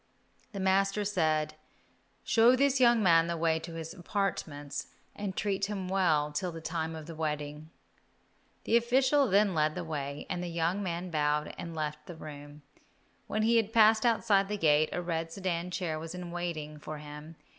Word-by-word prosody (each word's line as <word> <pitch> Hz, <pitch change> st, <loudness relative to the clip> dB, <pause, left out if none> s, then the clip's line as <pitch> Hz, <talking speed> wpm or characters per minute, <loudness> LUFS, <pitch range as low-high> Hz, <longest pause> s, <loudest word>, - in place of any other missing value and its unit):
The 200 Hz, -, -6 dB
master 195 Hz, +2 st, +2 dB
said, 155 Hz, -6 st, +1 dB, 0.7 s
"Show 235 Hz, +2 st, +5 dB
this 275 Hz, +1 st, +2 dB
young 240 Hz, -3 st, +5 dB
man 165 Hz, -2 st, +5 dB
the 170 Hz, 0 st, -2 dB
way 160 Hz, 0 st, +1 dB
to 165 Hz, +1 st, -8 dB
his 165 Hz, 0 st, -6 dB
apartments 165 Hz, -7 st, -3 dB, 0.3 s
and 200 Hz, -2 st, -5 dB
treat 195 Hz, -1 st, 0 dB
him 200 Hz, -2 st, -4 dB
well 165 Hz, -6 st, +2 dB
till 180 Hz, +4 st, -2 dB
the 165 Hz, -, -7 dB
time 160 Hz, 0 st, -3 dB
of 160 Hz, -1 st, -8 dB
the 165 Hz, -, -8 dB
wedding." 150 Hz, -1 st, -4 dB, 0.9 s
The 230 Hz, -, +4 dB
official 260 Hz, +4 st, +3 dB
then 200 Hz, 0 st, +4 dB
led 155 Hz, -1 st, +1 dB
the 180 Hz, -, -3 dB
way, 145 Hz, -3 st, -4 dB
and 175 Hz, -, -3 dB
the 180 Hz, -, -3 dB
young 170 Hz, +3 st, -1 dB
man 175 Hz, -1 st, -3 dB
bowed 150 Hz, -1 st, +1 dB
as -, -, -7 dB
he -, -, -7 dB
left 150 Hz, -1 st, -4 dB
the 175 Hz, -, -8 dB
room. 145 Hz, -1 st, -10 dB, 0.6 s
When 215 Hz, +1 st, -1 dB
he 230 Hz, +1 st, +4 dB
had 220 Hz, -1 st, +1 dB
passed 220 Hz, -1 st, +5 dB
outside 215 Hz, -4 st, +3 dB
the 210 Hz, +1 st, -2 dB
gate, 155 Hz, -3 st, +3 dB
a 175 Hz, -, -3 dB
red 165 Hz, -1 st, -2 dB
sedan 180 Hz, -1 st, -2 dB
chair 175 Hz, -4 st, -2 dB
was 165 Hz, +2 st, -7 dB
in 180 Hz, -1 st, -6 dB
waiting 160 Hz, -4 st, -4 dB
for 155 Hz, +1 st, -7 dB
him. 150 Hz, +2 st, -10 dB
170 Hz, 185 wpm, -30 LUFS, 155-200 Hz, 0.9 s, Show